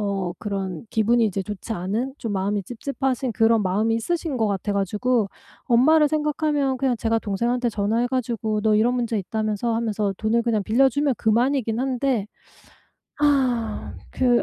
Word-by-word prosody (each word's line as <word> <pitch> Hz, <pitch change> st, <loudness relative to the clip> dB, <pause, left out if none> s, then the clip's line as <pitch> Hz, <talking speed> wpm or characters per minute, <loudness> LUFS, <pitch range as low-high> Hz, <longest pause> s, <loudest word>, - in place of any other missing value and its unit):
어 195 Hz, -3 st, -2 dB
그런 195 Hz, -2 st, -4 dB
기분이 225 Hz, +1 st, +3 dB
이제 195 Hz, -2 st, -1 dB
좋지 210 Hz, +3 st, -6 dB
않은 220 Hz, +8 st, -2 dB
좀 225 Hz, -, -4 dB
마음이 200 Hz, +1 st, -1 dB
찝찝하신 260 Hz, +2 st, -2 dB
그런 225 Hz, 0 st, +3 dB
마음이 215 Hz, +5 st, +1 dB
있으신 320 Hz, +2 st, -2 dB
것 220 Hz, -2 st, +1 dB
같아 200 Hz, 0 st, -1 dB
가지고 210 Hz, +4 st, +1 dB, 0.4 s
엄마를 300 Hz, +6 st, +5 dB
생각하면 300 Hz, -2 st, 0 dB
그냥 255 Hz, -2 st, 0 dB
제가 225 Hz, 0 st, 0 dB
동생한테 235 Hz, +4 st, -1 dB
전화해 220 Hz, +3 st, 0 dB
가지고 230 Hz, -4 st, -1 dB
"너 215 Hz, 0 st, +3 dB
이런 235 Hz, +3 st, +3 dB
문제 235 Hz, -3 st, -1 dB
있다면서?" 215 Hz, +3 st, -2 dB
하면서 215 Hz, -3 st, -1 dB
돈을 225 Hz, +2 st, +1 dB
그냥 225 Hz, -3 st, 0 dB
빌려 250 Hz, +6 st, +4 dB
주면 285 Hz, 0 st, 0 dB
그만이긴 235 Hz, +1 st, +1 dB
한데 260 Hz, -4 st, 0 dB, 0.9 s
아 255 Hz, -7 st, +1 dB, 0.2 s
그 245 Hz, -2 st, +3 dB
230 Hz, 345 characters per minute, -23 LUFS, 210-255 Hz, 0.9 s, 엄마를